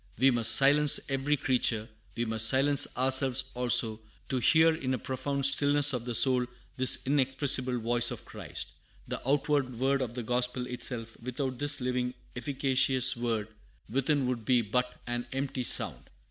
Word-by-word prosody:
We 135 Hz, +4 st, +4 dB
must 120 Hz, -2 st, +5 dB
silence 145 Hz, +1 st, +4 dB
every 135 Hz, +2 st, 0 dB
creature, 125 Hz, -5 st, 0 dB, 0.3 s
we 120 Hz, -, -1 dB
must 115 Hz, 0 st, +3 dB
silence 140 Hz, +3 st, +3 dB
ourselves 130 Hz, 0 st, +3 dB
also, 120 Hz, -3 st, +3 dB, 0.3 s
to 130 Hz, -, -1 dB
hear 160 Hz, +5 st, +4 dB
in 130 Hz, -5 st, -3 dB
a -, -, -4 dB
profound 135 Hz, +2 st, -2 dB
stillness 145 Hz, +1 st, +3 dB
of 120 Hz, -2 st, -4 dB
the 120 Hz, -1 st, -3 dB
soul 125 Hz, 0 st, +2 dB, 0.3 s
this 130 Hz, -1 st, +3 dB
inexpressible 135 Hz, -2 st, +1 dB
voice 120 Hz, +1 st, +1 dB
of -, -, -8 dB
Christ. -, -, -7 dB, 0.4 s
The -, -, -5 dB
outward 140 Hz, -3 st, 0 dB
word 135 Hz, +1 st, +1 dB
of 120 Hz, -2 st, -5 dB
the 125 Hz, -, -5 dB
gospel 125 Hz, +1 st, -1 dB
itself 120 Hz, -2 st, -2 dB
without 130 Hz, +1 st, -5 dB
this 145 Hz, 0 st, +1 dB
living 125 Hz, 0 st, -2 dB, 0.2 s
efficacious 130 Hz, 0 st, +1 dB
word 115 Hz, -3 st, -3 dB, 0.4 s
within 135 Hz, +2 st, 0 dB
would 125 Hz, -2 st, -3 dB
be 120 Hz, +1 st, +2 dB
but 125 Hz, +4 st, -3 dB
an 120 Hz, 0 st, -4 dB
empty 135 Hz, -1 st, -3 dB
sound." 125 Hz, -, -2 dB
130 Hz, 160 wpm, -28 LUFS, 120-135 Hz, 0.4 s, must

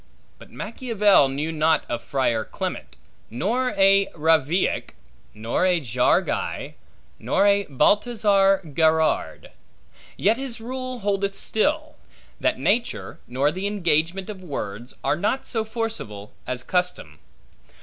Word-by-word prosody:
But -, -, -14 dB
Machiavel 210 Hz, -, +2 dB
knew 145 Hz, +4 st, -3 dB
not 160 Hz, 0 st, +2 dB
of 120 Hz, -1 st, -3 dB
a -, -, -22 dB
Friar 120 Hz, -5 st, 0 dB
Clement, -, -, -6 dB, 0.3 s
nor 235 Hz, -, -1 dB
a 195 Hz, 0 st, +5 dB
Ravillac, 160 Hz, -, +1 dB, 0.4 s
nor 110 Hz, +9 st, -1 dB
a 180 Hz, -2 st, +3 dB
Jaureguy, 125 Hz, -3 st, 0 dB, 0.5 s
nor 195 Hz, -, +1 dB
a 200 Hz, 0 st, +3 dB
Baltazar 195 Hz, -, +3 dB
Gerard; 160 Hz, +1 st, +1 dB, 0.7 s
yet 220 Hz, +3 st, +2 dB
his 260 Hz, -3 st, -5 dB
rule 255 Hz, +1 st, -5 dB
holdeth 200 Hz, -1 st, -1 dB
still, 300 Hz, +7 st, -1 dB, 0.4 s
that -, -, +1 dB
nature, 235 Hz, +4 st, -1 dB
nor 135 Hz, +4 st, +1 dB
the 185 Hz, +4 st, -3 dB
engagement 175 Hz, -2 st, 0 dB
of 190 Hz, -3 st, -11 dB
words, 120 Hz, -, -6 dB
are -, -, +2 dB
not 210 Hz, +10 st, -1 dB
so 225 Hz, -3 st, -1 dB
forcible, 220 Hz, -, -5 dB
as 125 Hz, 0 st, -3 dB
custom. 180 Hz, -, -2 dB
190 Hz, 120 wpm, -23 LUFS, 145-215 Hz, 0.7 s, a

